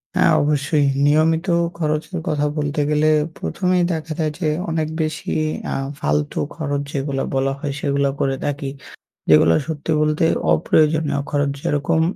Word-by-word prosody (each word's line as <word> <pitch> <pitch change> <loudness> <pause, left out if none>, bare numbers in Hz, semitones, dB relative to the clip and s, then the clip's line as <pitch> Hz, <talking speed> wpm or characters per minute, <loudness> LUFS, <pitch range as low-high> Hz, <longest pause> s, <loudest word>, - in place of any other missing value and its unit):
হ্যাঁ, - - +4
অবশ্যই। 145 0 +1 0.2
নিয়মিত 160 +4 +3 0.3
খরচের 155 +2 -2
কথা 150 -1 0
বলতে 145 0 -1
গেলে, 150 +1 +3 0.3
প্রথমেই 180 -1 0
দেখা 160 -1 -4
যায় 155 -1 0
যে 170 - 0 0.2
অনেক 160 -1 -1
বেশি 155 0 -3 0.4
আ - - -2 0.2
ফালতু 75 0 -1 0.2
খরচ 145 -3 -2
যেগুলা 135 -1 -2
বলা 135 0 +1
হয়, 140 -1 -3
সেগুলাও 140 -1 0
করে 135 -1 +1
থাকি। 145 -1 -2 0.6
যেগুলো 80 +1 +6
সত্যি 160 0 -3
বলতে 155 +1 +2 0.3
অপ্রয়োজনীয় 150 - +2
খরচ। 145 -1 +1
যেরকম, 150 +3 +1
150 Hz, 140 wpm, -20 LUFS, 140-160 Hz, 0.6 s, যেগুলো